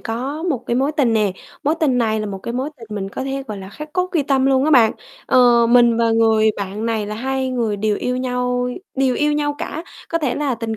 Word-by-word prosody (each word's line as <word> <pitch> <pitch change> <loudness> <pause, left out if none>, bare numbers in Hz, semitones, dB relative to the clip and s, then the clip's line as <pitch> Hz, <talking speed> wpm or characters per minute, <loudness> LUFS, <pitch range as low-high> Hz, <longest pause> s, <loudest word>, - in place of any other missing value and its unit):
có 260 +7 -4
một 285 -9 -2
cái 235 - 0
mối 275 +4 +1
tình 255 -6 +3
nè, 210 -4 +2 0.3
mối 300 +3 +2
tình 265 -6 +2
này 220 -2 +1
là 215 - -3
một 195 -1 -5
cái 235 +5 -5
mối 265 +4 -2
tình 230 -3 -12
mình 195 -1 -3
có 260 - -5
thể, 270 0 -3
gọi 210 - -5
là, 190 0 -9
khắc 300 +8 -9
cốt 365 +1 -1
ghi 320 -5 +2
tâm 270 -1 +1
luôn 265 0 +3
á 310 - +2
bạn. 240 -6 +6 0.3
Ờ, 240 -2 +5
mình 235 -1 +5
và 230 -1 +2
người 220 -1 +4
bạn 200 +3 -4
này 220 -2 -1
là 210 - -4
hai 265 +3 -2
người 230 -5 -1
đều 210 0 0
yêu 250 0 -2
nhau 250 -1 -1 0.3
đều 265 -2 +1
yêu 295 +2 +1
nhau 295 0 0
cả, 320 - -5 0.3
có 330 - 0
thể 290 -6 -1
là 285 -3 -1
tình 225 -1 -4
250 Hz, 255 wpm, -20 LUFS, 225-275 Hz, 0.3 s, bạn